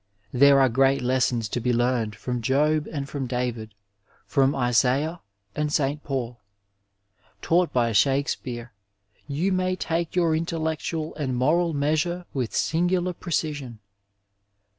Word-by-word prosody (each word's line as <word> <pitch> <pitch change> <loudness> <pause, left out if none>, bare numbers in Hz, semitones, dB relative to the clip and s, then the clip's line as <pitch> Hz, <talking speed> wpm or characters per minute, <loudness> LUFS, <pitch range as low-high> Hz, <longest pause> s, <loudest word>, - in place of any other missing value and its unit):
There 140 +2 +6
are 135 - +5
great 135 +2 +2
lessons 125 -3 +1
to 120 - -2
be 125 +1 0
learned 120 -3 0
from 125 -1 -4
Job 150 +5 +1
and 140 -3 -4
from 140 -2 -4
David, 120 -4 -3 0.5
from 135 -2 +2
Isaiah 135 +6 +1 0.3
and 150 0 -1
St. 145 -1 0
Paul. 125 -4 -4 1.0
Taught 175 +1 +2
by 120 -2 +1
Shakespeare 125 -1 0 0.5
you 155 +7 -1
may 185 0 0
take 165 -1 -2
your 170 -3 +2
intellectual 160 -1 -2
and 135 -5 -2
moral 165 +6 +2
measure 155 +5 0
with 125 -4 -3
singular 180 +2 +1
precision. 150 -8 -3
140 Hz, 125 wpm, -25 LUFS, 125-160 Hz, 1.0 s, There